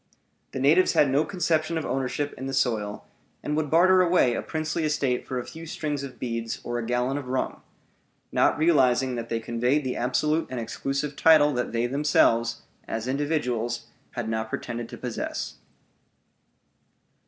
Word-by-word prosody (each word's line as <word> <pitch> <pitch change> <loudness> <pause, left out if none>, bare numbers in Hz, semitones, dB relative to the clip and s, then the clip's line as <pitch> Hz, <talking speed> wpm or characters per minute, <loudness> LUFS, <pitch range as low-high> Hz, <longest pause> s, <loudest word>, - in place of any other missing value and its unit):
The - - -4
natives 155 +8 +4
had 140 -3 +4
no 140 +3 +3
conception 160 -2 0
of 160 - -2
ownership 135 +3 -2
in 130 - -6
the 135 - -2
soil, 110 -6 -1 0.4
and 150 - -1
would 155 -1 -1
barter 185 +4 +5
away 175 -8 +3
a - - -2
princely 155 +1 -2
estate 145 -5 0
for 130 - -3
a 125 - -3
few 165 +1 -9
strings 150 -2 -3
of 140 -2 -8
beads 115 -2 -3
or 120 0 -3
a 115 - -4
gallon 125 +3 0
of 135 - -8
rum, 130 +1 -2 0.7
not - - +3
realizing 135 -5 +3
that 115 -1 -5
they 115 - -1
conveyed 125 +5 0
the 130 -1 -2
absolute 150 +6 0
and 130 - -4
exclusive 140 +5 -3
title 150 -2 +5
that 125 -1 -2
they 115 +1 0
themselves, 115 -4 +2 0.2
as 115 +2 -3
individuals, 130 -4 -1 0.3
had 120 -3 -3
not 110 0 -2
pretended 120 0 -4
to - - -8
possess. - - -4
135 Hz, 165 wpm, -26 LUFS, 120-150 Hz, 0.7 s, barter